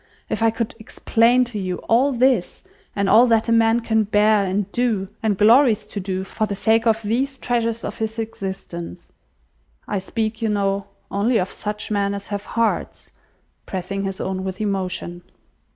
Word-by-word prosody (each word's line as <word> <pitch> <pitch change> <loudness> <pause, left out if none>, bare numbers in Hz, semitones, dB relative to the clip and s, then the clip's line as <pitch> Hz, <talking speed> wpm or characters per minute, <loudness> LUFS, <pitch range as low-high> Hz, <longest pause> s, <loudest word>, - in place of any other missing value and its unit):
If - - -2
I 225 - +5
could 225 0 -3
explain 230 +2 +2
to 235 -4 -5
you 185 -2 -2
all 255 +5 +4
this, 250 -6 +1 0.3
and 200 -1 0
all 225 +5 +6
that 225 -1 +2
a - - +2
man 230 +1 +4
can 220 -1 +1
bear 210 0 +3
and 195 +2 0
do, 220 -6 0
and 215 -4 0
glories 220 0 +5
to 210 0 -6
do, 190 0 -3
for 215 +3 -2
the 200 - -3
sake 225 +3 +2
of 225 0 +2
these 260 +6 -1
treasures 230 -2 -1
of - - -5
his 220 0 -3
existence! 190 - -6 0.8
I 200 - -1
speak, 220 +3 -3
you 225 - +1
know, 200 -1 0 0.2
only 220 +4 +2
of 185 -2 -1
such 210 +1 -5
men 200 -1 0
as 200 0 -8
have 205 0 -4
hearts!" 230 -1 -2 0.6
pressing 190 +1 -3
his 195 -1 -4
own 190 0 -3
with 190 0 -5
emotion. 185 -4 -3
215 Hz, 175 wpm, -21 LUFS, 195-230 Hz, 0.8 s, all